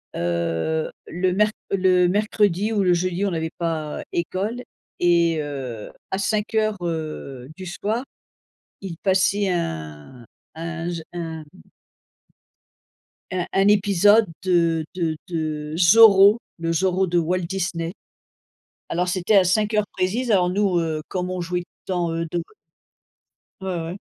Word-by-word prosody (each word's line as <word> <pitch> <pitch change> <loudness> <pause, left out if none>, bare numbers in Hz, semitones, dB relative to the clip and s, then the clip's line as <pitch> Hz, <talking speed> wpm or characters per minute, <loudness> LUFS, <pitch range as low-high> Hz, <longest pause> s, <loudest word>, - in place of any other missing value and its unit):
heu, 85 - -1 0.2
le 180 +1 0
mer 210 +2 +3 0.2
le 185 -2 +4
mercredi 205 0 +1
ou 205 - +2
le 180 -1 +4
jeudi, 185 +2 0
on 195 - 0
n'avait 160 -1 -2
pas 160 -3 -3
école 200 +8 -2 0.4
et 170 -2 +3
heu, 130 -7 -6 0.2
à 190 - 0
17:00, 215 +1 0
heu, 155 -6 -5
du 190 - -8
soir, 210 +7 -2 0.8
il 175 -4 -6
passait 195 +1 +2
un 80 - -4 0.3
un 170 +1 -5
j 170 -2 -4
un 165 -2 -5 1.9
un 180 -2 -1
un 195 +1 +3
épisode 205 +1 +5 0.2
de 170 -3 +2
de 165 -4 -1
de 155 -2 -3
Zorro, 200 +3 +7 0.2
le 165 0 -1
Zorro 185 +2 +1
de 175 0 0
Walt 180 +2 +1
Disney. 170 -2 -3 1.0
Alors 180 +2 -1
c'était 185 +3 +2
à 190 - +6
17:00 210 +3 +1
précises 215 +7 -1
alors 180 -3 +4
nous, 190 -2 +1
heu, 160 -2 -2
comme 180 -1 -3
on 185 - -3
jouait 175 +1 -2 0.2
tant, 175 -3 -1
heu, 165 0 -2
de 175 -1 -1 1.2
Ouais, 190 -1 -3
ouais. 170 +4 -5
180 Hz, 130 wpm, -23 LUFS, 165-195 Hz, 1.9 s, Zorro